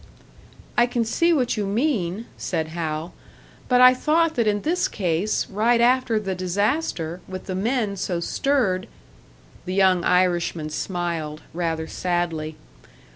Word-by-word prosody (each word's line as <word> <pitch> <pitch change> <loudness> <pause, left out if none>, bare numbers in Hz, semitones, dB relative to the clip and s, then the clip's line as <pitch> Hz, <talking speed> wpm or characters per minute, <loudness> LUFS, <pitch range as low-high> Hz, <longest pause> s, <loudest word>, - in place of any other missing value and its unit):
"I 240 - +5
can 240 -1 -1
see 335 +10 +2
what 255 -8 +1
you 205 -2 -1
mean," 215 - -1
said 160 -3 -3
Hal. 160 0 -4 0.6
"But 250 -1 +5
I 255 0 +9
thought 320 +5 +2
that 235 -7 +1
in 205 -1 +1
this 350 +3 +1
case, 185 +1 -1
right 225 +4 +2
after 240 -2 +3
the 195 -3 -3
disaster, 185 - -1
with 185 0 -7
the 190 - -4
men 215 +1 0
so 180 -2 -2
stirred 195 -2 0 0.4
" - - -26
The 185 - -2
young 190 -2 +4
Irishman 175 -4 +1
smiled, 165 -3 -3
rather 165 -2 -2
sadly. 165 -3 -2
190 Hz, 140 wpm, -23 LUFS, 170-240 Hz, 0.6 s, I